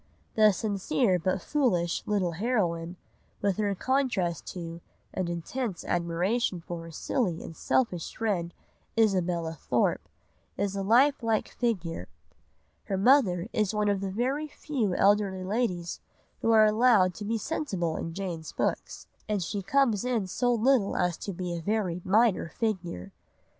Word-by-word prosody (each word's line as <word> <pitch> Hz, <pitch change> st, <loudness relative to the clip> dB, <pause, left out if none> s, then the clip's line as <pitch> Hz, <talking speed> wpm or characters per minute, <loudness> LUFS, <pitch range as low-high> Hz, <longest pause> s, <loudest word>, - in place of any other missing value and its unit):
The 215 Hz, -1 st, +6 dB
sincere 200 Hz, 0 st, 0 dB
but 185 Hz, +2 st, -1 dB
foolish 185 Hz, -, +1 dB
little 195 Hz, -4 st, +1 dB
heroine, 175 Hz, -4 st, -1 dB, 0.4 s
with 200 Hz, -2 st, 0 dB
her 205 Hz, -2 st, 0 dB
contrast 230 Hz, -, 0 dB
to 170 Hz, -2 st, -6 dB, 0.3 s
and 185 Hz, -2 st, -2 dB
intense 180 Hz, +4 st, -4 dB
admiration 175 Hz, +4 st, 0 dB
for 170 Hz, 0 st, -6 dB
her -, -, -9 dB
silly 180 Hz, -, -1 dB
and 165 Hz, -, -9 dB
selfish 180 Hz, -8 st, 0 dB
friend, 190 Hz, -7 st, -1 dB, 0.5 s
Isabella 180 Hz, -6 st, +1 dB
Thorpe, 155 Hz, -, 0 dB, 0.5 s
is 200 Hz, 0 st, -1 dB
a 195 Hz, -, -1 dB
life 255 Hz, +8 st, +4 dB
like 225 Hz, -2 st, 0 dB
figure. 180 Hz, -, -2 dB, 0.8 s
Her 195 Hz, -, -1 dB
mother 195 Hz, -5 st, +4 dB
is 215 Hz, -1 st, 0 dB
one 210 Hz, -1 st, +2 dB
of 200 Hz, -1 st, 0 dB
the 195 Hz, -, -2 dB
very 260 Hz, +9 st, -1 dB
few 250 Hz, -10 st, -2 dB
elderly 200 Hz, -2 st, +3 dB
ladies 185 Hz, -4 st, -1 dB, 0.4 s
who -, -, +1 dB
are 220 Hz, -1 st, +7 dB
allowed 215 Hz, -4 st, +4 dB
to 210 Hz, -, -8 dB
be 225 Hz, +2 st, -1 dB
sensible 195 Hz, -, -2 dB
in 165 Hz, 0 st, -5 dB
Jane's 175 Hz, -5 st, -5 dB
books, -, -, -2 dB, 0.2 s
and 205 Hz, -3 st, 0 dB
she 200 Hz, +5 st, -3 dB
comes 225 Hz, 0 st, +2 dB
in 245 Hz, -5 st, 0 dB
so 245 Hz, +7 st, 0 dB
little 240 Hz, -2 st, +2 dB
as 180 Hz, -1 st, +1 dB
to 200 Hz, -, -5 dB
be 180 Hz, -1 st, -4 dB
a 170 Hz, -, -4 dB
very 185 Hz, -2 st, -1 dB
minor 210 Hz, -3 st, +3 dB
figure. 180 Hz, -, -3 dB
195 Hz, 150 wpm, -28 LUFS, 175-225 Hz, 0.8 s, are